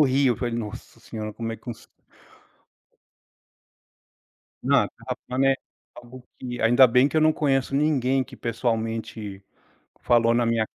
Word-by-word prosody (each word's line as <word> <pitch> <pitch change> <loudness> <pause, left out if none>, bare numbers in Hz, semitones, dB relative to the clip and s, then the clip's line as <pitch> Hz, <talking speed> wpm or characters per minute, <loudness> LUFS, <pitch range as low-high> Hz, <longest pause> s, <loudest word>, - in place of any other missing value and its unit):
rio, 135 -2 +3
falei: 120 -2 -3
"Nossa 115 +1 -7
Senhora, 110 -2 -6
como 115 +1 -4
é 115 - -6
que - - -26
conse" 120 -3 -8 2.8
Não, - - +3
terra - - -7
plana 130 +2 +1
é - - +1 0.4
algo 120 +1 -12 0.2
que 125 -1 -6
ainda 120 +4 +6
bem 125 +3 +4
que 160 - -4
eu 155 - +5
não 155 0 +5
conheço 135 -3 0
ninguém 135 -3 +2
que, 130 0 -12
pessoalmente, 115 -4 -3 0.6
falou 115 -1 +3
na 120 - +2
minha 115 -1 +1
120 Hz, 145 wpm, -24 LUFS, 115-135 Hz, 2.8 s, ainda